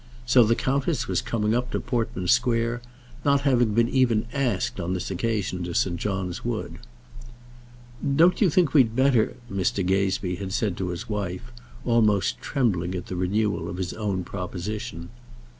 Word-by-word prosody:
So 125 0 +6
the 115 +1 +3
countess 140 +3 0
was 90 -2 0
coming 110 -1 0
up 125 +1 0
to - - -2
Portman 115 -7 -2
Square, 120 0 +2 0.4
not 140 -1 +3
having 120 -6 +2
been 115 0 +4
even 120 -4 +2
asked 125 -10 -1
on 90 +1 -2
this 90 - -4
occasion 95 -2 -1
to 85 -1 -5
St. 85 -2 +1
John's 95 -2 -3
Wood. 120 -2 -4 1.4
"Don't 175 +6 +4
you 200 - +5
think 165 -3 +2
we'd 125 -7 +4
better," 130 -4 +3
Mr. 95 -2 -1
Gazebee 95 -1 0
had 95 -1 -5
said 100 -4 0
to 95 - -2
his 90 +7 -5
wife, 105 +2 -4 0.3
almost 110 -5 +2
trembling 95 - 0
at 90 0 -4
the 95 - -5
renewal 95 -1 0
of 90 - -5
his 95 -1 -3
own 100 -4 -2
proposition. 90 -1 -5
105 Hz, 160 wpm, -25 LUFS, 95-120 Hz, 1.4 s, So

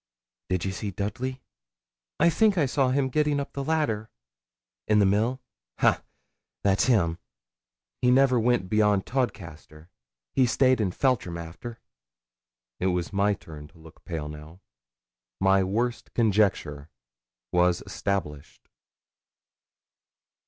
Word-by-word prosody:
'Did 90 -1 -1
ye 95 - -1
see 100 +1 -4
Dudley?' 120 +7 -4 0.8
'I 170 - +5
think 215 +1 +3
I 155 - +3
saw 135 0 +1
him 135 +1 +1
getting 150 +2 +1
up 140 - -5
the 140 - -3
ladder.' 135 -9 -1 0.8
'In 105 - +3
the 105 - +5
mill? 110 +7 +1 0.4
Ha! - - +3 0.6
that's 100 -1 +3
him. 90 -10 +2 0.8
He 125 - +3
never 130 -1 +4
went 120 -4 +1
beyond 105 -1 +2
Todcaster. 85 - -4 0.4
He 130 - +3
staid 130 0 +3
in 100 - +1
Feltram 100 -5 0
after.' 85 +8 -8 1.0
It 95 - 0
was 90 0 -1
my 100 +1 +2
turn 75 -4 -11
to 85 - -22
look 80 -1 -16
pale 80 -4 -5
now. 75 +4 -11 0.8
My 95 0 +4
worst 115 +6 -2
conjecture 95 -10 +1 0.6
was 90 0 +2
established. 75 -8 -4
105 Hz, 125 wpm, -26 LUFS, 90-125 Hz, 1.0 s, I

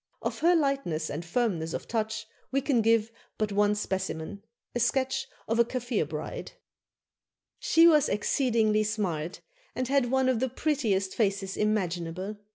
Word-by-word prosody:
Of - - -2
her 345 +2 +4
lightness 275 - 0
and 150 +4 -4
firmness 170 -4 -1
of - - -6
touch 220 -1 -2 0.2
we 270 - +1
can 270 -4 +2
give 225 0 +3 0.3
but 215 -1 -1
one 205 +1 +3
specimen, 190 -1 -3 0.3
a 240 - -1
sketch 265 +3 +1 0.2
of 225 +1 0
a - - +8
Kaffir 240 - -2
bride: 150 0 -6 1.1
"She 330 +1 +5
was 305 -3 +5
exceedingly 215 0 +2
smart, 185 -7 -2 0.3
and 255 0 -1
had 275 -3 +2
one 265 0 +2
of 255 -3 +2
the 260 +1 0
prettiest 230 -9 0
faces 195 -3 0
imaginable. 185 -1 -1
215 Hz, 150 wpm, -28 LUFS, 190-260 Hz, 1.1 s, a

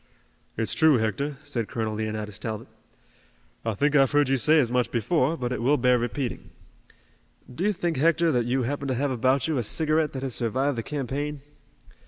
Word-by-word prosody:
"It's 115 0 0
true, 155 -4 +5
Hector," 135 +6 -2
said 120 -6 -3
Colonel 110 -2 -3
Leonidas 105 -1 -4
Talbot. 110 -2 -5 1.0
"I 115 -2 -2
think 145 +7 +1
I've 135 -1 +4
heard 145 -2 +3
you 135 - +3
say 155 +6 +4
as 125 -6 +2
much 125 -1 +1
before, 140 - +1
but 125 -3 -3
it 125 - -2
will 140 +5 +3
bear 125 0 +3
repeating. 120 +2 -4 1.0
Do 165 - -4
you 210 - +3
think, 175 -5 -2
Hector, 165 +3 +3
that 120 -4 0
you 130 +1 +1
happen 140 +3 -3
to 130 - 0
have 140 +2 0
about 130 +2 +1
you 155 -5 0
a - - -1
cigarette 155 +5 0
that 130 -1 -5
has 130 -3 -3
survived 130 +5 -1
the 115 - -2
campaign?" 145 +2 -4
130 Hz, 195 wpm, -26 LUFS, 120-145 Hz, 1.0 s, true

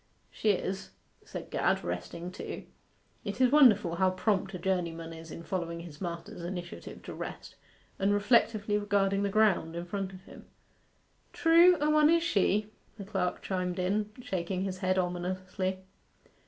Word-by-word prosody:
'She 220 - 0
is,' 190 -1 -1 0.3
said - - -8
Gad, - - +1
resting 175 +2 -5
too - - -6 0.6
(it 200 +2 -5
is 255 -1 +5
wonderful 210 - +6
how 190 +1 +4
prompt 190 +1 0
a - - -2
journeyman 170 -3 -2
is 165 0 -10
in 165 - -8
following 170 -1 -3
his 160 -4 -11
master's 170 -1 -5
initiative 175 0 -7
to - - -7
rest) - - -7 0.4
and 195 +1 +2
reflectively 210 0 +3
regarding 200 -1 +1
the 200 - +1
ground 195 -6 +2
in 170 0 -4
front 195 +1 -3
of 185 -1 -12
him. - - -14 0.9
'True: 340 +2 +6
a 295 - +1
one 305 0 +5
is 335 0 +4
she,' 210 - +1 0.3
the 200 - -7
clerk 190 -3 -2
chimed 180 -2 -2
in, 205 +3 0
shaking 185 -1 -2
his 185 -1 -3
head 185 0 +1
ominously. 185 +1 -2
190 Hz, 155 wpm, -30 LUFS, 180-205 Hz, 0.9 s, wonderful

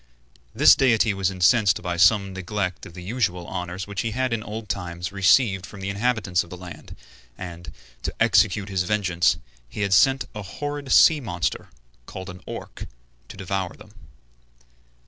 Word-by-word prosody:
This 80 - +7
deity 115 -5 +3
was 95 -1 0
incensed 95 +2 +3
by 90 -1 -2
some 95 +3 +4
neglect 95 0 -4
of 85 - -15
the 90 - -9
usual 95 -4 -1
honors 90 +2 -5
which 100 -1 -4
he 115 - -2
had 130 -2 0
in 115 - -1
old 110 +1 -7
times 90 -2 -4
received 100 0 +3
from 100 +1 -10
the 95 0 -3
inhabitants 105 -4 0
of 85 - -16
the 90 - -8
land, 90 -1 -11 0.4
and, 85 -4 -8 0.3
to - - -4
execute 100 +1 +3
his 95 -2 0
vengeance, 90 -4 +1 0.3
had 100 -2 -1
sent 135 +8 +4
a 105 - -6
horrid 145 +6 -5
sea 160 -2 +6
monster, 90 -9 -3 0.4
called 95 0 -7
an 90 0 -12
Orc, - - -8 0.4
to - - -11
devour - - -3
them. - - -16
95 Hz, 165 wpm, -24 LUFS, 90-110 Hz, 0.4 s, This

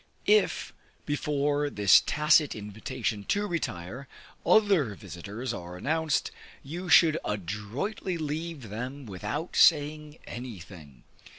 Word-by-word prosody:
If, 430 0 +2 0.3
before 145 -1 0
this 105 -7 +6
tacit 150 0 +3
invitation 105 +1 -4
to 205 +1 0
retire, 130 - -4 0.4
other 190 - +3
visiters 100 +9 -6
are 90 +1 -7
announced, 155 - 0 0.3
you 175 +6 -6
should 165 -2 +6
adroitly 105 - -3
leave 155 -4 -4
them 125 +6 -6
without 120 - -5
saying 150 -1 +3
anything. 90 - -9
140 Hz, 100 wpm, -28 LUFS, 105-155 Hz, 0.4 s, this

